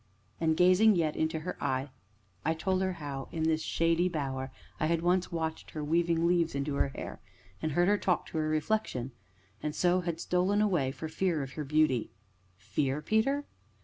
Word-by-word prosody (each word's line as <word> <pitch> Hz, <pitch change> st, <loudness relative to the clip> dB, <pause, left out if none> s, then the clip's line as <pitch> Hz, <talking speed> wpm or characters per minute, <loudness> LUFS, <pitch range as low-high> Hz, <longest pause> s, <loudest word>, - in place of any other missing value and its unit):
And, 160 Hz, -1 st, +2 dB
gazing 185 Hz, +4 st, +6 dB
yet 160 Hz, -3 st, +1 dB
into 160 Hz, 0 st, -1 dB
her 180 Hz, +3 st, -4 dB
eyes, 130 Hz, +2 st, -1 dB, 0.5 s
I 160 Hz, +2 st, +1 dB
told 185 Hz, +3 st, 0 dB
her 190 Hz, -1 st, 0 dB
how, 145 Hz, -5 st, -6 dB
in 160 Hz, -, -2 dB
this 160 Hz, 0 st, +2 dB
shady 165 Hz, +2 st, +2 dB
bower, 135 Hz, -5 st, -3 dB, 0.3 s
I 155 Hz, -, +1 dB
had 165 Hz, 0 st, +1 dB
once 180 Hz, +1 st, +2 dB
watched 160 Hz, -1 st, -3 dB
her 155 Hz, -, -5 dB
weaving 165 Hz, +2 st, +2 dB
leaves 170 Hz, -3 st, +2 dB
into 140 Hz, +1 st, -1 dB
her 140 Hz, -, +2 dB
hair, 135 Hz, -, -7 dB, 0.4 s
and 155 Hz, -, -1 dB
heard 175 Hz, +3 st, +3 dB
her 205 Hz, 0 st, +3 dB
talk 180 Hz, -, +1 dB
to 160 Hz, -, -2 dB
her 155 Hz, 0 st, 0 dB
reflection 155 Hz, -, -1 dB, 0.5 s
and 150 Hz, 0 st, -3 dB
so 180 Hz, +1 st, +3 dB
had 170 Hz, -2 st, -3 dB
stolen 180 Hz, +4 st, +1 dB
away, 175 Hz, -11 st, +2 dB
for 160 Hz, -, -6 dB
fear 160 Hz, -2 st, 0 dB
of 135 Hz, -, -7 dB
her 150 Hz, +4 st, -4 dB
beauty. 145 Hz, -5 st, +2 dB, 0.5 s
"Fear, 135 Hz, +8 st, -1 dB
Peter?" 275 Hz, +7 st, +1 dB
160 Hz, 185 wpm, -30 LUFS, 150-180 Hz, 0.5 s, gazing